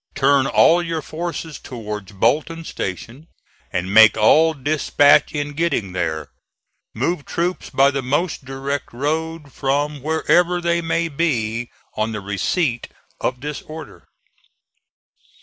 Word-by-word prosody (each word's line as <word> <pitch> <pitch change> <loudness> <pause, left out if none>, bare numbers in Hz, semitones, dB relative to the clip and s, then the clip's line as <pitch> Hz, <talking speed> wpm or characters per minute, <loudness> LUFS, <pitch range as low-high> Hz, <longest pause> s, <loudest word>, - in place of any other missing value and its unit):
Turn 135 -1 +3
all 170 +5 +5
your 165 -3 -3
forces 160 -1 -5
towards 105 -4 -7
Bolton 150 - 0
station, 115 - -6 0.4
and 90 +2 -2
make 110 0 +8
all 155 +9 +5
dispatch 145 0 +3
in 145 -1 -3
getting 150 - -1
there. 80 -4 -3 0.6
Move 145 +6 -1
troops 175 +4 -2
by 135 +1 +4
the 135 0 -2
most 145 +6 -1
direct 135 +1 -4
road 155 +2 -3
from 145 +1 -1
wherever 170 +4 +2
they 170 0 0
may 165 0 0
be 120 -7 -1 0.3
on 110 +1 -1
the 105 - -3
receipt 120 - -1 0.3
of 125 -1 -2
this 150 +1 -5
order." 155 -2 -11
145 Hz, 125 wpm, -20 LUFS, 115-160 Hz, 0.6 s, make